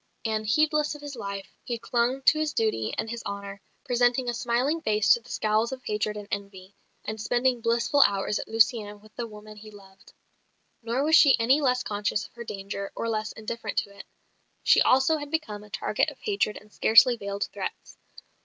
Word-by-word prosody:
And, 215 Hz, -1 st, -1 dB
heedless 300 Hz, +5 st, +2 dB
of 295 Hz, -, -11 dB
his 285 Hz, -2 st, -7 dB
life, 200 Hz, -3 st, -6 dB
he 240 Hz, -, -3 dB
clung 240 Hz, +3 st, -1 dB
to 310 Hz, -, +5 dB
his 310 Hz, -1 st, -1 dB
duty 215 Hz, -, 0 dB
and -, -, -2 dB
his 230 Hz, +1 st, -5 dB
honour, 200 Hz, -1 st, -6 dB, 0.2 s
presenting 245 Hz, +1 st, +2 dB
a 240 Hz, -, 0 dB
smiling 245 Hz, +7 st, 0 dB
face 215 Hz, -5 st, +2 dB
to -, -, +6 dB
the 245 Hz, -, -18 dB
scowls 215 Hz, +2 st, 0 dB
of 260 Hz, -1 st, -7 dB
hatred 210 Hz, 0 st, -2 dB
and 205 Hz, -1 st, -8 dB
envy, 200 Hz, -1 st, -6 dB, 0.3 s
and 215 Hz, 0 st, -5 dB
spending 245 Hz, +1 st, +1 dB
blissful 235 Hz, +5 st, +2 dB
hours 200 Hz, +1 st, -2 dB
at -, -, -6 dB
Lucienne 220 Hz, -2 st, +1 dB
with 215 Hz, +1 st, -20 dB
the 235 Hz, -, -4 dB
woman 215 Hz, 0 st, -12 dB
he 215 Hz, +1 st, -11 dB
loved. 195 Hz, -2 st, -17 dB, 0.7 s
Nor 235 Hz, +4 st, -1 dB
was 315 Hz, +2 st, +4 dB
she 285 Hz, -4 st, +7 dB
any 260 Hz, +6 st, +3 dB
less 250 Hz, -2 st, +1 dB
conscious 210 Hz, 0 st, -2 dB
of -, -, -16 dB
her 235 Hz, -, -8 dB
danger, 200 Hz, -2 st, -6 dB
or 230 Hz, -, -3 dB
less 215 Hz, -1 st, -2 dB
indifferent 220 Hz, -1 st, -6 dB
to 200 Hz, -, -1 dB
it. 200 Hz, -, -12 dB, 0.6 s
She -, -, +5 dB
also 265 Hz, +5 st, +4 dB
had 290 Hz, -1 st, -7 dB
become 230 Hz, -10 st, -3 dB
a 210 Hz, -, -15 dB
target 215 Hz, -, 0 dB
of -, -, -13 dB
hatred 400 Hz, -, -1 dB
and 210 Hz, 0 st, -22 dB
scarcely 240 Hz, +3 st, +6 dB
veiled 200 Hz, -2 st, -4 dB
threats. -, -, -7 dB
225 Hz, 200 wpm, -26 LUFS, 210-250 Hz, 0.7 s, she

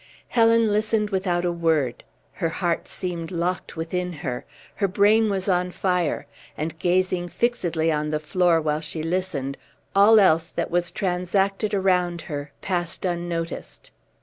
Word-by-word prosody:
Helen 230 Hz, -1 st, +4 dB
listened 210 Hz, 0 st, +1 dB
without 180 Hz, -2 st, 0 dB
a 175 Hz, -, +1 dB
word; 160 Hz, -7 st, 0 dB, 0.4 s
her 165 Hz, -, +2 dB
heart 170 Hz, 0 st, -1 dB
seemed 170 Hz, -3 st, -4 dB
locked 180 Hz, +1 st, -2 dB
within 180 Hz, +2 st, -2 dB
her; 125 Hz, -2 st, -3 dB, 0.3 s
her 200 Hz, -, +2 dB
brain 210 Hz, +3 st, +4 dB
was 195 Hz, -1 st, -1 dB
on 180 Hz, -1 st, +2 dB
fire; 180 Hz, -2 st, 0 dB, 0.3 s
and 160 Hz, +1 st, -4 dB
gazing 180 Hz, 0 st, +1 dB
fixedly 170 Hz, -9 st, 0 dB
on 150 Hz, 0 st, -1 dB
the 155 Hz, -, 0 dB
floor 170 Hz, +2 st, +2 dB
while 155 Hz, -1 st, -1 dB
she 155 Hz, 0 st, -4 dB
listened, 165 Hz, -6 st, -2 dB, 0.4 s
all 210 Hz, +3 st, +7 dB
else 165 Hz, -4 st, +4 dB
that -, -, -3 dB
was 175 Hz, 0 st, +1 dB
transacted 195 Hz, +3 st, 0 dB
around 180 Hz, -3 st, +1 dB
her 145 Hz, -1 st, -6 dB
passed 175 Hz, -1 st, -2 dB
unnoticed. 170 Hz, -2 st, -4 dB
175 Hz, 145 wpm, -24 LUFS, 165-190 Hz, 0.4 s, all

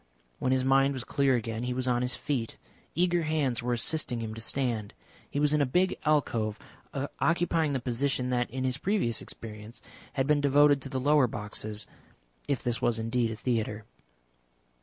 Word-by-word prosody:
When 130 Hz, -, +1 dB
his 130 Hz, 0 st, +2 dB
mind 135 Hz, +1 st, +4 dB
was 130 Hz, -, -3 dB
clear 135 Hz, -1 st, +2 dB
again 115 Hz, -1 st, -2 dB
he 125 Hz, 0 st, -2 dB
was 130 Hz, 0 st, -2 dB
on 120 Hz, -1 st, +2 dB
his 125 Hz, 0 st, -1 dB
feet; 125 Hz, -3 st, -3 dB, 0.4 s
eager 175 Hz, 0 st, +3 dB
hands 150 Hz, -7 st, 0 dB
were 120 Hz, 0 st, 0 dB
assisting 120 Hz, 0 st, -1 dB
him 110 Hz, -1 st, -4 dB
to 115 Hz, -, -7 dB
stand. 115 Hz, -3 st, -1 dB, 0.3 s
He 145 Hz, -, -2 dB
was 150 Hz, 0 st, +3 dB
in 150 Hz, -, +3 dB
a -, -, +4 dB
big 180 Hz, +8 st, +2 dB
alcove, 115 Hz, -8 st, +1 dB, 0.6 s
occupying 165 Hz, -3 st, +2 dB
the 135 Hz, -, 0 dB
position 125 Hz, +1 st, -1 dB
that 125 Hz, -1 st, +1 dB
in 130 Hz, +1 st, -3 dB
his 130 Hz, +1 st, 0 dB
previous 190 Hz, -, 0 dB
experience 110 Hz, 0 st, -9 dB, 0.3 s
had 135 Hz, -, +1 dB
been 150 Hz, 0 st, +3 dB
devoted 145 Hz, 0 st, +5 dB
to 135 Hz, -, -7 dB
the 130 Hz, -, -2 dB
lower 145 Hz, 0 st, +4 dB
boxes. 105 Hz, -1 st, -4 dB, 0.6 s
If 140 Hz, -4 st, -1 dB
this 120 Hz, -1 st, 0 dB
was 120 Hz, -2 st, +2 dB
indeed 115 Hz, +1 st, 0 dB
a 110 Hz, -, -4 dB
theatre. 110 Hz, -3 st, -2 dB
130 Hz, 180 wpm, -29 LUFS, 115-145 Hz, 0.6 s, devoted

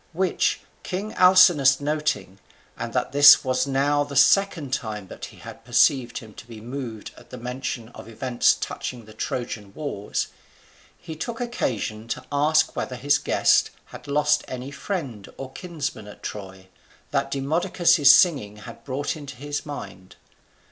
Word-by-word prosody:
Which 185 Hz, +1 st, 0 dB, 0.2 s
king 200 Hz, +4 st, -5 dB
Alcinous 175 Hz, -7 st, +6 dB
noting, 145 Hz, -10 st, -2 dB, 0.4 s
and -, -, -5 dB
that -, -, -1 dB
this 145 Hz, 0 st, +8 dB
was 130 Hz, 0 st, 0 dB
now 140 Hz, +2 st, +1 dB
the 145 Hz, -1 st, -8 dB
second 170 Hz, -4 st, +3 dB
time 105 Hz, -7 st, -4 dB
that -, -, -8 dB
he -, -, -14 dB
had 115 Hz, -, -11 dB
perceived 125 Hz, +1 st, +2 dB
him 110 Hz, -2 st, -9 dB
to 115 Hz, -, -13 dB
be 115 Hz, -2 st, -10 dB
moved 115 Hz, -2 st, -7 dB
at -, -, -16 dB
the 125 Hz, -, -8 dB
mention 125 Hz, -1 st, -5 dB
of 120 Hz, -, -12 dB
events 120 Hz, +2 st, +1 dB
touching 120 Hz, -3 st, -6 dB
the 110 Hz, -, -14 dB
Trojan 110 Hz, -3 st, -5 dB
wars, 120 Hz, -10 st, -3 dB, 0.7 s
he 165 Hz, -3 st, -9 dB
took 230 Hz, +9 st, -5 dB
occasion 115 Hz, -, -3 dB
to -, -, -5 dB
ask 155 Hz, +3 st, +2 dB
whether 130 Hz, -, -3 dB
his 145 Hz, +3 st, +2 dB
guest -, -, +3 dB, 0.2 s
had -, -, -11 dB
lost 150 Hz, +1 st, +2 dB
any 130 Hz, +2 st, -6 dB
friend 140 Hz, -, -5 dB
or 135 Hz, -1 st, -7 dB
kinsman 160 Hz, -, -5 dB
at 105 Hz, -, -13 dB
Troy, 95 Hz, -2 st, -8 dB, 0.4 s
that -, -, 0 dB
Demodocus's 160 Hz, +2 st, +2 dB
singing 140 Hz, -, +5 dB
had 115 Hz, +2 st, -12 dB
brought 140 Hz, +3 st, -3 dB
into 145 Hz, -4 st, -9 dB
his 145 Hz, +3 st, -5 dB
mind. 100 Hz, -10 st, -9 dB
135 Hz, 155 wpm, -24 LUFS, 115-150 Hz, 0.7 s, this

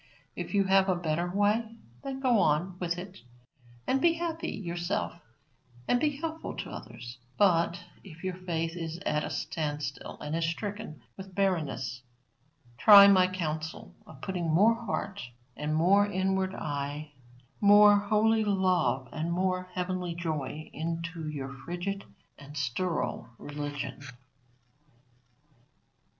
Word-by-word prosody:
If -, -, -4 dB
you 200 Hz, -, +5 dB
have 195 Hz, 0 st, +4 dB
a 185 Hz, -, +3 dB
better 170 Hz, 0 st, -1 dB
way, 210 Hz, +4 st, +1 dB, 0.3 s
then 270 Hz, -1 st, -5 dB
go 245 Hz, -5 st, +4 dB
on 170 Hz, +3 st, +2 dB
with 170 Hz, -1 st, -1 dB
it 185 Hz, +1 st, -8 dB, 0.7 s
and 265 Hz, +1 st, +1 dB
be 335 Hz, +1 st, +5 dB
happy 330 Hz, -1 st, -3 dB
yourself 175 Hz, -1 st, -2 dB, 0.7 s
and 245 Hz, -, +2 dB
helpful 310 Hz, +2 st, -2 dB
to -, -, -5 dB
others; 120 Hz, +1 st, -9 dB, 0.2 s
but 170 Hz, -4 st, +3 dB, 0.2 s
if 170 Hz, -2 st, -13 dB
your 185 Hz, -1 st, -1 dB
faith 170 Hz, -2 st, -3 dB
is 165 Hz, -1 st, -4 dB
at 150 Hz, 0 st, +1 dB
a -, -, -3 dB
standstill 145 Hz, -3 st, -4 dB
and 150 Hz, +2 st, -3 dB
is 165 Hz, 0 st, 0 dB
stricken 200 Hz, -, -5 dB
with 190 Hz, -1 st, -10 dB
barrenness, 155 Hz, -10 st, -1 dB, 0.8 s
try 200 Hz, -, +10 dB
my 185 Hz, -2 st, +6 dB
counsel 160 Hz, -4 st, -4 dB
of -, -, -13 dB
putting 180 Hz, -4 st, -2 dB
more 200 Hz, +9 st, +5 dB
heart 215 Hz, -4 st, -4 dB, 0.3 s
and 150 Hz, +1 st, -2 dB
more 195 Hz, +6 st, +4 dB
inward 190 Hz, -1 st, 0 dB
eye, 145 Hz, 0 st, -4 dB, 0.5 s
more 205 Hz, 0 st, +8 dB
holy 215 Hz, +2 st, +3 dB
love 185 Hz, -10 st, +1 dB
and 160 Hz, +5 st, -3 dB
more 185 Hz, +1 st, 0 dB
heavenly 180 Hz, -1 st, -2 dB
joy, 155 Hz, -3 st, -3 dB
into 165 Hz, 0 st, -4 dB
your 140 Hz, -2 st, -5 dB
frigid 175 Hz, +8 st, -5 dB, 0.3 s
and 145 Hz, +1 st, -10 dB
sterile 140 Hz, +6 st, -2 dB
religion. 145 Hz, 0 st, -5 dB
180 Hz, 130 wpm, -29 LUFS, 155-200 Hz, 0.8 s, try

